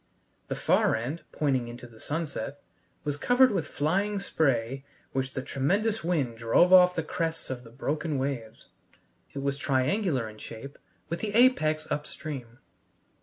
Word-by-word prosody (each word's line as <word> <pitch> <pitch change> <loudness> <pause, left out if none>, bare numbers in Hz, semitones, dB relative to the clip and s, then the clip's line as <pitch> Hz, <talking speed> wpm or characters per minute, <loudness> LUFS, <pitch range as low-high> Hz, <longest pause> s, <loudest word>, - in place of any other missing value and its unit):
The - - -2
far - - +3
end, 130 +9 -3
pointing 130 -5 0
into 120 +1 -9
the 115 -2 -15
sunset, 145 -3 -4 0.4
was 145 -1 -2
covered 245 - +5
with 175 -7 -1
flying 195 +7 0
spray 135 -8 0 0.3
which 130 0 -2
the 130 - -3
tremendous 200 +13 0
wind 140 -10 0
drove 120 +11 +4
off 180 -1 +8
the 165 - 0
crests 165 -2 -3
of 125 -1 -5
the 115 - -13
broken 145 +5 -2
waves. 130 -5 -4 0.6
It 140 - -4
was 140 0 -1
triangular 135 - +1
in 110 0 -11
shape, 115 +7 -9 0.3
with 170 - -2
the 210 -1 -3
apex 155 -11 +4
upstream. 140 -5 -5
145 Hz, 150 wpm, -28 LUFS, 130-170 Hz, 0.6 s, off